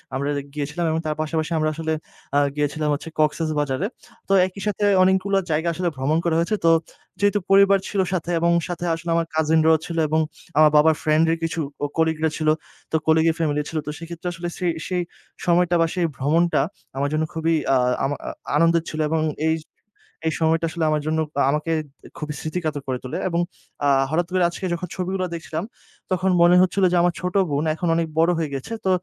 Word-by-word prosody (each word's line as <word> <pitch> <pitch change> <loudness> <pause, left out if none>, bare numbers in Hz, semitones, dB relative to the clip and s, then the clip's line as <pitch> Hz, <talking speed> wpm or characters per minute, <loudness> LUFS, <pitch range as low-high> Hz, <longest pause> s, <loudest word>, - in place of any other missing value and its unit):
আমরা 140 +2 -1 0.2
গিয়েছিলাম 150 +4 -3
এবং 160 - 0
তার 155 -1 -1
পাশাপাশি 155 +1 -2
আমরা 155 0 +1
আসলে 160 0 -2 0.4
আ - - +6 0.2
গিয়েছিলাম 150 +1 -1
হচ্ছে 145 +3 -4
কক্সেসবাজারে। 155 0 0 0.4
তো 195 - +1
একইসাথে 195 +2 -3 0.2
অনেকগুলা 190 +1 +2
জায়গা 160 +2 0
আসলে 175 +2 -1
ভ্রমণ 135 +4 0
করা 170 -2 +1
হয়েছে। 170 +6 +1
তো - - +6 0.5
যেহেতু 205 +1 +3
পরিবার 195 0 +6
ছিল 200 - -2
সাথে 175 -2 -2
এবং 170 +1 +2 0.2
সাথে 175 -1 -4
আসলে 165 +1 -7
আমার 165 0 +1
কাজিনরাও 160 0 +4
ছিল 170 - -5
এবং 155 +1 +1 0.4
আমার 155 0 +7
বাবার 155 +1 +5
ফ্রেন্ড 155 +1 +3
এর 165 - +1
কিছু 165 0 -2 0.2
ও - - +3
কলিগরা 160 -1 +2
ছিল। 155 - -2 0.4
তো - - 0
কলিগের 160 0 +4
ফ্যামিলি 150 -2 +1
ছিল। 160 - -4
তো - - -1
সেক্ষেত্রে 170 +1 -7
আসলে 170 +1 -5
ছে 185 - -3 0.2
সেই 180 -1 0 0.4
সময়টা 175 0 +3
বা - - +5
সেই 180 -2 +1
ভ্রমণটা 165 +6 +2
খুবই 190 +4 -15
আমার 140 +1 0
জন্য 155 +1 +1
খুবই 160 +1 0 0.2
আ - - +5 0.3
আমা 140 +2 0 0.4
আনন্দের 165 +1 +3
ছিল। 155 - -5
এবং 160 0 +1 0.2
এইয 160 0 +2 0.7
এই 160 - +1
সময়টা 160 +1 +2
আসলে 165 -1 -1
আমার 150 0 +1
জন্য 160 0 +1 0.2
আ - - +4
আমাকে 150 +3 -1 0.5
খুবই 150 0 -4
স্মৃতিকাতর 155 -2 -3
করে 130 -1 -2
তোলে। 130 - -4
এবং 170 0 0 0.4
আ - - +4 0.2
হঠাৎ 165 +4 +1
করে 185 -1 +3
আজকে 175 - -6
যখন 175 +1 -4
ছবিগুলা 185 0 -2
দেখছিলাম, 165 0 -4 0.5
তখন 185 +1 +1
মনে 175 +1 +6
হচ্ছিল 185 +1 +2
যে, - - +4
আমার 175 0 +2
ছোট 180 +1 -3 0.2
বোন 145 +2 0
এখন 175 - -3
অনেক 165 0 0
বড় 165 +2 +4
হয়ে 160 -2 -1
গেছে। 135 - -6
তো - - +2
165 Hz, 195 wpm, -23 LUFS, 155-175 Hz, 0.7 s, আমার